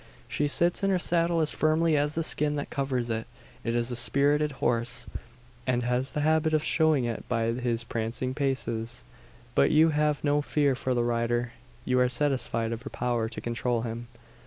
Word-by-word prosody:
She 140 Hz, +3 st, 0 dB
sits 170 Hz, +6 st, +1 dB
in 195 Hz, -, +1 dB
her 190 Hz, -, +3 dB
saddle 170 Hz, -1 st, +1 dB
as 155 Hz, -, +2 dB
firmly 155 Hz, +1 st, +2 dB
as 150 Hz, +1 st, 0 dB
the 165 Hz, -, 0 dB
skin 150 Hz, -1 st, +1 dB
that 145 Hz, -, -4 dB
covers 135 Hz, -3 st, -1 dB
it. 110 Hz, 0 st, -3 dB, 0.4 s
It 115 Hz, -, -1 dB
is 120 Hz, +1 st, 0 dB
a -, -, -2 dB
spirited 145 Hz, +4 st, +2 dB
horse, 120 Hz, -2 st, -1 dB, 0.6 s
and 125 Hz, -1 st, +1 dB
has 125 Hz, +2 st, -1 dB
the 150 Hz, -, -1 dB
habit 155 Hz, +1 st, +2 dB
of 155 Hz, -, +1 dB
showing 155 Hz, -6 st, +2 dB
it 115 Hz, -2 st, -3 dB
by 115 Hz, -2 st, +1 dB
his 120 Hz, -1 st, -1 dB
prancing 115 Hz, +3 st, -3 dB
paces. 125 Hz, -4 st, -2 dB, 0.5 s
But 70 Hz, 0 st, +4 dB
you 160 Hz, +1 st, +5 dB
have 150 Hz, -1 st, 0 dB
no 145 Hz, 0 st, +2 dB
fear 145 Hz, -1 st, +1 dB
for 130 Hz, 0 st, -2 dB
the 120 Hz, -, +1 dB
rider: 120 Hz, 0 st, 0 dB, 0.3 s
you 125 Hz, 0 st, +2 dB
are 125 Hz, 0 st, +3 dB
satisfied 125 Hz, -4 st, 0 dB
of 115 Hz, 0 st, -4 dB
her -, -, -7 dB
power 120 Hz, -2 st, -1 dB
to 110 Hz, -, -7 dB
control 120 Hz, 0 st, -1 dB
him. 120 Hz, 0 st, -5 dB
130 Hz, 190 wpm, -27 LUFS, 120-150 Hz, 0.6 s, you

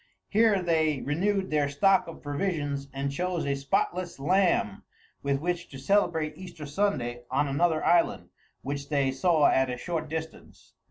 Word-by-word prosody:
Here 215 Hz, -3 st, +3 dB
they 160 Hz, -4 st, +1 dB
renewed 190 Hz, +6 st, 0 dB
their 150 Hz, -2 st, +2 dB
stock 190 Hz, +7 st, +3 dB
of 165 Hz, -, -10 dB
provisions, 145 Hz, -3 st, -2 dB
and 140 Hz, +1 st, -3 dB
chose 180 Hz, +3 st, -2 dB
a 140 Hz, -, 0 dB
spotless 170 Hz, +6 st, -1 dB
lamb 175 Hz, -, +1 dB, 0.4 s
with 140 Hz, -1 st, 0 dB
which 175 Hz, +2 st, -3 dB
to 135 Hz, -, -9 dB
celebrate 160 Hz, 0 st, +1 dB
Easter 175 Hz, -5 st, -9 dB
Sunday 140 Hz, -8 st, -1 dB
on 140 Hz, +2 st, +1 dB
another 155 Hz, +3 st, +1 dB
island, 175 Hz, -1 st, +2 dB, 0.3 s
which 140 Hz, +1 st, -4 dB
they 140 Hz, -3 st, +1 dB
saw 155 Hz, +2 st, +3 dB
at 130 Hz, -1 st, +3 dB
a 125 Hz, -, -3 dB
short 165 Hz, +3 st, -4 dB
distance. 160 Hz, 0 st, -8 dB
155 Hz, 155 wpm, -27 LUFS, 140-180 Hz, 0.4 s, Here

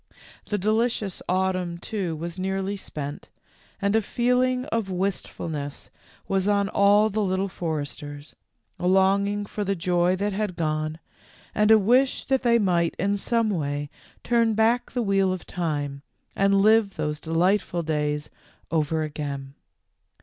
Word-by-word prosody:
The 210 Hz, -, -1 dB
delicious 215 Hz, -1 st, 0 dB
autumn, 185 Hz, -2 st, 0 dB
too, 180 Hz, -2 st, -3 dB
was 170 Hz, +3 st, -6 dB
nearly 190 Hz, +1 st, -1 dB
spent, 145 Hz, -6 st, -6 dB, 0.5 s
and 200 Hz, +1 st, +1 dB
a 225 Hz, -, +4 dB
feeling 250 Hz, +3 st, +1 dB
of 225 Hz, -4 st, -1 dB
wistfulness 170 Hz, -6 st, -4 dB, 0.4 s
was 195 Hz, 0 st, 0 dB
on 200 Hz, -1 st, +2 dB
all 205 Hz, +2 st, +4 dB
the 215 Hz, +2 st, 0 dB
Little 190 Hz, 0 st, 0 dB
Foresters, 145 Hz, -4 st, -5 dB, 0.4 s
a 180 Hz, -, -1 dB
longing 200 Hz, +2 st, +3 dB
for 205 Hz, +1 st, -4 dB
the 195 Hz, 0 st, 0 dB
joy 175 Hz, 0 st, +2 dB
that 200 Hz, +2 st, -1 dB
had 205 Hz, -2 st, -2 dB
gone, 155 Hz, -1 st, -1 dB, 0.6 s
and 210 Hz, 0 st, +2 dB
a 220 Hz, -, +8 dB
wish 250 Hz, +6 st, +2 dB
that 265 Hz, -1 st, +1 dB
they 235 Hz, -2 st, +4 dB
might 175 Hz, -6 st, +1 dB
in 200 Hz, +3 st, +1 dB
some 225 Hz, +2 st, +1 dB
way 145 Hz, -4 st, -2 dB, 0.3 s
turn 230 Hz, -2 st, +2 dB
back 225 Hz, +3 st, +2 dB
the 245 Hz, -1 st, -1 dB
"wheel 195 Hz, -2 st, +2 dB
of 185 Hz, -2 st, -4 dB
time" 145 Hz, -5 st, -3 dB, 0.3 s
and 195 Hz, 0 st, +3 dB
live 215 Hz, -2 st, +4 dB
those 150 Hz, -2 st, -2 dB
delightful 175 Hz, +2 st, +1 dB
days 150 Hz, -1 st, -1 dB, 0.4 s
over 160 Hz, 0 st, +1 dB
again. 140 Hz, -3 st, -5 dB
190 Hz, 140 wpm, -25 LUFS, 160-210 Hz, 0.6 s, a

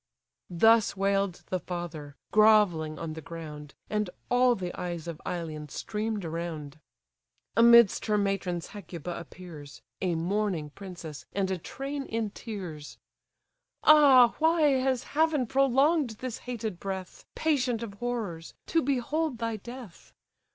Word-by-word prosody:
Thus 220 Hz, +4 st, +4 dB
wail'd 195 Hz, -1 st, 0 dB
the 185 Hz, -, +1 dB
father, 165 Hz, -5 st, -6 dB, 0.2 s
grovelling 205 Hz, -8 st, +4 dB
on 160 Hz, 0 st, -5 dB
the 160 Hz, -, -7 dB
ground, 150 Hz, -3 st, -9 dB
And 210 Hz, -2 st, -1 dB, 0.2 s
all 245 Hz, 0 st, +5 dB
the 180 Hz, -3 st, -5 dB
eyes 175 Hz, -2 st, -5 dB
of 165 Hz, -2 st, -6 dB
Ilion 155 Hz, -4 st, -4 dB
stream'd 210 Hz, +3 st, -3 dB
around. 160 Hz, -3 st, -5 dB, 0.8 s
Amidst 235 Hz, -2 st, +6 dB
her 210 Hz, -1 st, +2 dB
matrons 195 Hz, -4 st, -1 dB
Hecuba 175 Hz, -4 st, -6 dB
appears: 155 Hz, -6 st, -11 dB, 0.2 s
(A 180 Hz, -3 st, 0 dB
mourning 175 Hz, -3 st, -1 dB
princess, 170 Hz, -7 st, -9 dB
and 195 Hz, -1 st, 0 dB
a 185 Hz, -, -2 dB
train 275 Hz, -, -5 dB
in 225 Hz, -2 st, -2 dB
tears;) 180 Hz, -10 st, -7 dB, 0.9 s
"Ah 275 Hz, -6 st, +7 dB
why 325 Hz, +1 st, +3 dB, 0.2 s
has 260 Hz, -1 st, 0 dB
Heaven 305 Hz, -3 st, +1 dB
prolong'd 275 Hz, 0 st, +2 dB
this 255 Hz, -1 st, -5 dB
hated 220 Hz, -7 st, -4 dB
breath, 190 Hz, -2 st, -6 dB
Patient 255 Hz, -7 st, +1 dB
of 215 Hz, -4 st, -6 dB
horrors, 205 Hz, -7 st, -4 dB
to 330 Hz, -, +2 dB
behold 285 Hz, +1 st, -1 dB
thy 230 Hz, 0 st, -2 dB
death? 240 Hz, -3 st, -11 dB
200 Hz, 130 wpm, -28 LUFS, 170-240 Hz, 0.9 s, Ah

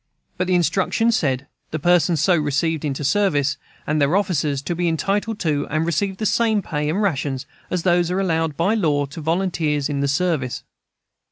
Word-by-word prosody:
But 180 Hz, 0 st, -1 dB
the 185 Hz, -, +2 dB
instructions 195 Hz, +6 st, +2 dB
said: 135 Hz, -7 st, 0 dB, 0.2 s
"The 155 Hz, -, -3 dB
persons 170 Hz, 0 st, +3 dB
so 180 Hz, +5 st, +4 dB
received 155 Hz, +1 st, 0 dB
into 145 Hz, -1 st, -2 dB
service, 145 Hz, -3 st, +1 dB, 0.3 s
and 150 Hz, 0 st, 0 dB
their 140 Hz, +5 st, +3 dB
officers, 150 Hz, -8 st, 0 dB
to 175 Hz, -, -2 dB
be 175 Hz, +1 st, -1 dB
entitled 200 Hz, +6 st, -1 dB
to 150 Hz, -4 st, 0 dB
and 155 Hz, +1 st, 0 dB
receive 190 Hz, +4 st, -1 dB
the 215 Hz, -, -3 dB
same 220 Hz, -1 st, +2 dB
pay 150 Hz, -2 st, -2 dB
and 175 Hz, +6 st, 0 dB
rations 140 Hz, -7 st, -1 dB, 0.2 s
as 180 Hz, -1 st, -2 dB
are 175 Hz, +1 st, +2 dB
allowed 165 Hz, -5 st, 0 dB
by 190 Hz, +6 st, +2 dB
law 150 Hz, -9 st, +1 dB
to 140 Hz, +4 st, -9 dB
volunteers 160 Hz, -3 st, 0 dB
in 145 Hz, -1 st, -2 dB
the 140 Hz, -, +1 dB
service." 145 Hz, -4 st, -1 dB
165 Hz, 180 wpm, -21 LUFS, 145-185 Hz, 0.3 s, so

